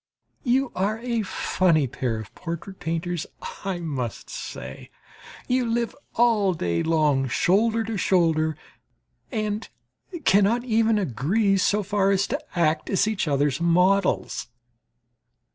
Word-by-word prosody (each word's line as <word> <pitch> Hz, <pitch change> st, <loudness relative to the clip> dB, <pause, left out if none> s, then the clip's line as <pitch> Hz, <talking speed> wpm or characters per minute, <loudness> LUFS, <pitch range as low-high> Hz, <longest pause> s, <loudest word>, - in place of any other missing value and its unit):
You 260 Hz, 0 st, +1 dB
are 200 Hz, +4 st, 0 dB
a 235 Hz, -1 st, -1 dB
funny 180 Hz, -5 st, +1 dB
pair 120 Hz, -2 st, -2 dB
of 110 Hz, -1 st, -9 dB
portrait 175 Hz, +3 st, -7 dB
painters, 165 Hz, +1 st, -3 dB, 0.4 s
I 195 Hz, -2 st, -2 dB
must 130 Hz, -8 st, -4 dB
say! 65 Hz, +1 st, -7 dB, 0.6 s
You 255 Hz, 0 st, +2 dB
live 235 Hz, 0 st, -1 dB, 0.2 s
all 215 Hz, -6 st, +3 dB
day 85 Hz, -, -1 dB
long 150 Hz, -5 st, +2 dB
shoulder 220 Hz, -, +2 dB
to 225 Hz, -1 st, -3 dB
shoulder 160 Hz, -5 st, +2 dB, 0.7 s
and 215 Hz, -2 st, -2 dB, 0.6 s
cannot 205 Hz, +5 st, +4 dB
even 225 Hz, -2 st, +2 dB
agree 195 Hz, -, +1 dB
so 205 Hz, +2 st, +2 dB
far 200 Hz, 0 st, +1 dB
as 195 Hz, 0 st, +2 dB
to -, -, -2 dB, 0.2 s
act 155 Hz, -2 st, +1 dB
as 195 Hz, +2 st, +2 dB
each 215 Hz, -6 st, -1 dB
other's 145 Hz, +1 st, +1 dB
models. 180 Hz, -, +2 dB
190 Hz, 125 wpm, -24 LUFS, 155-215 Hz, 0.7 s, cannot